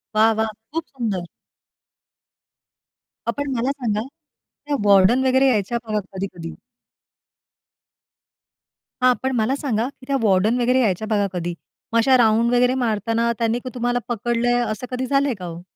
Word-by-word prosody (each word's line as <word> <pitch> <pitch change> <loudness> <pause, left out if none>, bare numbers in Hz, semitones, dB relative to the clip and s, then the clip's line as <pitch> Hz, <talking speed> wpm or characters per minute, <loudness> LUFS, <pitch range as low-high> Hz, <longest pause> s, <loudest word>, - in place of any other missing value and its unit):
वाह, 220 +1 +5
वाह! 220 - +1 0.2
खूप 325 +2 -2
सुंदर. 210 -9 -3 2.1
पण 285 -1 -2
मला 245 +4 0
सांगा 230 -7 -2 0.7
त्या 290 -1 0
वॉर्डन 200 +6 +5
वगैरे 265 +1 +4
यायच्या 230 0 +1
बघा 215 -1 0
कधी-कधी 185 -4 -6 2.5
हां. 255 - +6
पण 265 - 0
मला 235 +3 +1
सांगा 245 -5 -1
की 265 -2 -17
त्या 275 - 0
वॉर्डन 215 +3 +2
वगैरे 250 +2 +3
यायच्या 215 -1 0
बघा 205 -2 +1
कधी. 175 -1 -3 0.4
मग - - +3
अशा 255 +3 +5
राउंड 230 +1 +3
वगैरे 250 +1 +3
मारताना 230 +2 0
त्यांनी 230 +1 +1
तुम्हाला 245 0 0
पकडलंय 240 +1 0
असं 240 +1 -3
कधी 255 +1 -2
झालंय 275 0 +2
का 180 - -6
हो? 170 0 -7
235 Hz, 140 wpm, -21 LUFS, 210-255 Hz, 2.5 s, हां